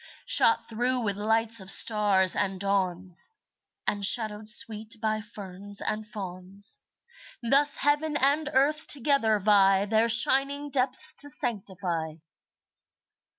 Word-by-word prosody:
Shot 455 Hz, -, +3 dB
through 245 Hz, +3 st, -2 dB
with 205 Hz, -4 st, -3 dB
lights 225 Hz, +2 st, 0 dB
of 190 Hz, -1 st, -6 dB
stars 200 Hz, -4 st, +3 dB
and 195 Hz, -2 st, -3 dB
dawns, 185 Hz, -, 0 dB, 0.6 s
And 205 Hz, -1 st, -3 dB
shadowed 215 Hz, 0 st, +3 dB
sweet 220 Hz, 0 st, +1 dB
by 215 Hz, 0 st, -3 dB
ferns 205 Hz, -2 st, -8 dB
and 215 Hz, 0 st, -5 dB
fawns, 195 Hz, 0 st, -5 dB, 0.7 s
Thus 280 Hz, +3 st, +2 dB
heaven 295 Hz, +1 st, -1 dB
and 290 Hz, +3 st, 0 dB
earth 295 Hz, +4 st, +1 dB
together 270 Hz, -5 st, +2 dB
vie 195 Hz, -1 st, +2 dB
Their 220 Hz, +2 st, 0 dB
shining 275 Hz, +5 st, +2 dB
depths 260 Hz, -1 st, -1 dB
to 290 Hz, -, +1 dB
sanctify. 190 Hz, -, -2 dB
215 Hz, 115 wpm, -25 LUFS, 195-255 Hz, 0.7 s, Shot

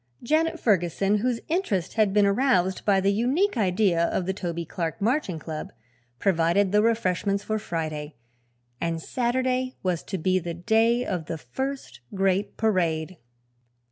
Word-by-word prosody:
Janet 315 Hz, +6 st, +1 dB
Ferguson, 195 Hz, 0 st, +2 dB
whose 240 Hz, +1 st, -1 dB
interest 245 Hz, -, -1 dB
had 215 Hz, -3 st, +2 dB
been 205 Hz, 0 st, +4 dB
aroused 200 Hz, -4 st, +2 dB
by 200 Hz, -2 st, +4 dB
the 195 Hz, +1 st, +2 dB
unique 275 Hz, -, +1 dB
idea 185 Hz, -5 st, +2 dB
of 180 Hz, -, -1 dB
the 190 Hz, -, -1 dB
Toby 170 Hz, -3 st, -4 dB
Clark 165 Hz, +2 st, -4 dB
Marching 220 Hz, -, 0 dB
Club, 155 Hz, -1 st, -6 dB, 0.5 s
provided 180 Hz, +3 st, +2 dB
the 210 Hz, +1 st, +4 dB
refreshments 200 Hz, -3 st, +1 dB
for 215 Hz, 0 st, -1 dB
Friday, 155 Hz, -5 st, -4 dB, 0.7 s
and 165 Hz, -1 st, -1 dB
Saturday 255 Hz, +5 st, -1 dB
was 180 Hz, -3 st, 0 dB
to 190 Hz, -, -3 dB
be 185 Hz, +2 st, +1 dB
the 170 Hz, -1 st, -5 dB
day 225 Hz, +7 st, +2 dB
of 175 Hz, -4 st, -3 dB
the 165 Hz, -, -3 dB
first 270 Hz, -, -5 dB, 0.2 s
great 195 Hz, +1 st, 0 dB
parade. 175 Hz, -5 st, 0 dB
195 Hz, 145 wpm, -25 LUFS, 175-230 Hz, 0.7 s, been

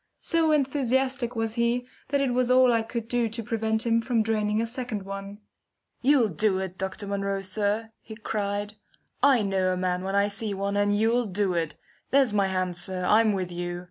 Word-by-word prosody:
So 330 Hz, -1 st, +2 dB
enthusiastic 265 Hz, -3 st, +1 dB
was 225 Hz, -1 st, -1 dB
he 235 Hz, +1 st, 0 dB, 0.2 s
that 280 Hz, 0 st, +1 dB
it 265 Hz, -3 st, +1 dB
was 250 Hz, 0 st, +1 dB
all 255 Hz, -1 st, +5 dB
I 230 Hz, -, +2 dB
could 225 Hz, 0 st, -5 dB
do 235 Hz, -1 st, 0 dB
to 230 Hz, +1 st, -5 dB
prevent 220 Hz, 0 st, -1 dB
him 230 Hz, 0 st, +2 dB
from 230 Hz, -1 st, +1 dB
draining 215 Hz, -1 st, 0 dB
a 230 Hz, -, +1 dB
second 230 Hz, -3 st, -4 dB
one. 195 Hz, +1 st, -7 dB, 0.6 s
"You'll 255 Hz, -4 st, +4 dB
do 190 Hz, +3 st, +1 dB
it, 190 Hz, -1 st, -4 dB
Dr. 190 Hz, +2 st, -4 dB
Munro, 200 Hz, 0 st, -2 dB
sir!" 205 Hz, +3 st, -1 dB
he 220 Hz, -, -10 dB
cried. 205 Hz, -1 st, -3 dB, 0.5 s
"I 265 Hz, -6 st, +5 dB
know 190 Hz, -2 st, +1 dB
a 185 Hz, -, -1 dB
man 180 Hz, 0 st, -1 dB
when 195 Hz, +1 st, -2 dB
I 200 Hz, 0 st, +3 dB
see 205 Hz, 0 st, -3 dB
one, 200 Hz, +1 st, -2 dB
and 205 Hz, 0 st, +2 dB
you'll 230 Hz, +2 st, +2 dB
do 195 Hz, -1 st, 0 dB
it. 165 Hz, -3 st, -2 dB, 0.3 s
There's 270 Hz, -5 st, +3 dB
my 200 Hz, -2 st, +2 dB
hand, 185 Hz, -1 st, -1 dB
sir! 185 Hz, 0 st, -1 dB
I'm 215 Hz, +2 st, +4 dB
with 185 Hz, -2 st, -3 dB
you! 175 Hz, 0 st, -4 dB
215 Hz, 200 wpm, -26 LUFS, 195-235 Hz, 0.6 s, all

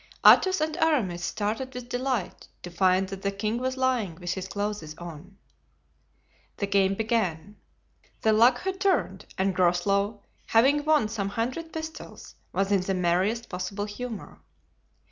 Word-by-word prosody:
Athos 375 Hz, -2 st, +7 dB
and 310 Hz, +1 st, -1 dB
Aramis 240 Hz, -, +1 dB
started 220 Hz, +8 st, -3 dB
with 250 Hz, -1 st, -6 dB
delight 245 Hz, -5 st, -3 dB, 0.2 s
to 175 Hz, -, -7 dB
find 185 Hz, +2 st, +2 dB
that 195 Hz, 0 st, -7 dB
the 200 Hz, -, 0 dB
king 215 Hz, +4 st, -2 dB
was 260 Hz, +1 st, -2 dB
lying 250 Hz, -9 st, 0 dB
with 175 Hz, +1 st, -3 dB
his 190 Hz, -1 st, -5 dB
clothes 200 Hz, -6 st, -4 dB
on. 175 Hz, +3 st, -10 dB, 1.2 s
The 200 Hz, -, -1 dB
game 195 Hz, -1 st, +2 dB
began. 210 Hz, -4 st, -1 dB, 0.7 s
The 220 Hz, -, +4 dB
luck 245 Hz, +3 st, +5 dB
had 380 Hz, 0 st, -3 dB
turned, 390 Hz, -2 st, 0 dB
and 190 Hz, 0 st, +1 dB
Groslow, 195 Hz, +4 st, +1 dB, 0.2 s
having 275 Hz, +6 st, +4 dB
won 305 Hz, -7 st, +3 dB
some 210 Hz, -3 st, -3 dB
hundred 255 Hz, +10 st, -3 dB
pistoles, 320 Hz, 0 st, -8 dB, 0.2 s
was 195 Hz, +1 st, 0 dB
in 200 Hz, -2 st, +3 dB
the 190 Hz, +1 st, -1 dB
merriest 185 Hz, +6 st, +1 dB
possible 185 Hz, +3 st, -4 dB
humor. 220 Hz, +1 st, -7 dB
205 Hz, 145 wpm, -27 LUFS, 190-250 Hz, 1.2 s, Athos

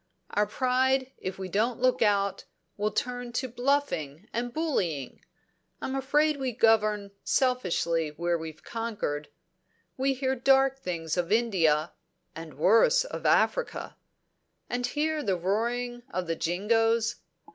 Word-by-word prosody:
Our 210 Hz, 0 st, +1 dB
pride, 260 Hz, +3 st, +1 dB
if 185 Hz, 0 st, -5 dB
we 190 Hz, -1 st, -5 dB
don't 220 Hz, +6 st, 0 dB
look 255 Hz, 0 st, +2 dB
out, 200 Hz, -2 st, +1 dB, 0.3 s
will 210 Hz, +1 st, 0 dB
turn 245 Hz, +1 st, -3 dB
to 260 Hz, +2 st, -1 dB
bluffing 240 Hz, -, -1 dB
and 240 Hz, +1 st, -2 dB
bullying. 185 Hz, -, -2 dB, 0.6 s
I'm 265 Hz, -, -4 dB
afraid 290 Hz, +3 st, +2 dB
we 260 Hz, -3 st, -2 dB
govern 215 Hz, -3 st, +2 dB
selfishly 175 Hz, -, +1 dB
where 170 Hz, +3 st, -1 dB
we've 160 Hz, -1 st, -7 dB
conquered. 210 Hz, -11 st, -3 dB, 0.7 s
We 270 Hz, +1 st, +1 dB
hear 265 Hz, 0 st, 0 dB
dark 270 Hz, +1 st, +3 dB
things 165 Hz, -7 st, -3 dB
of 175 Hz, +1 st, -1 dB
India, 175 Hz, -9 st, +2 dB, 0.4 s
and 165 Hz, -1 st, -9 dB
worse 230 Hz, -, +5 dB
of -, -, -4 dB
Africa. -, -, +1 dB, 0.8 s
And 245 Hz, 0 st, 0 dB
hear 305 Hz, +3 st, -1 dB
the 195 Hz, -8 st, 0 dB
roaring 240 Hz, +6 st, -1 dB
of 185 Hz, -7 st, -3 dB
the 165 Hz, 0 st, -2 dB
Jingoes! 225 Hz, +7 st, +1 dB
230 Hz, 130 wpm, -28 LUFS, 180-260 Hz, 0.8 s, worse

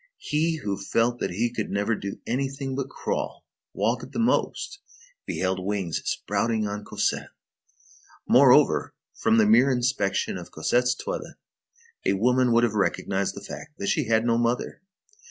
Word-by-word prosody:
He 160 Hz, +2 st, 0 dB
who 100 Hz, -1 st, -2 dB
felt 115 Hz, +4 st, +1 dB
that -, -, -1 dB
he 115 Hz, +7 st, -1 dB
could 110 Hz, -, -3 dB
never 100 Hz, +3 st, 0 dB
do 100 Hz, -2 st, -5 dB
anything 135 Hz, +2 st, -2 dB
but 135 Hz, -1 st, -3 dB
crawl, -, -, -4 dB, 0.3 s
walk 115 Hz, +5 st, 0 dB
at -, -, -11 dB
the -, -, -5 dB
most, 260 Hz, +6 st, 0 dB, 0.5 s
beheld 95 Hz, 0 st, -1 dB
wings 95 Hz, -4 st, -2 dB
sprouting 110 Hz, -2 st, 0 dB
on 105 Hz, 0 st, -5 dB
Cosette. -, -, -1 dB, 1.0 s
Moreover, -, -, +5 dB, 0.2 s
from 110 Hz, 0 st, +2 dB
the 110 Hz, -, +5 dB
mere 120 Hz, +6 st, +5 dB
inspection 125 Hz, -5 st, 0 dB
of -, -, -10 dB
Cosette's 125 Hz, +1 st, +1 dB
toilet, -, -, -5 dB, 0.7 s
a -, -, +2 dB
woman 125 Hz, +5 st, +3 dB
would 115 Hz, +1 st, +4 dB
have 115 Hz, -3 st, +2 dB
recognized 100 Hz, -1 st, 0 dB
the -, -, -8 dB
fact 150 Hz, +2 st, -9 dB
that 200 Hz, +1 st, -2 dB
she 155 Hz, -7 st, +1 dB
had 110 Hz, 0 st, +2 dB
no 115 Hz, 0 st, +2 dB
mother. 120 Hz, +1 st, -1 dB
115 Hz, 155 wpm, -25 LUFS, 105-130 Hz, 1.0 s, Moreover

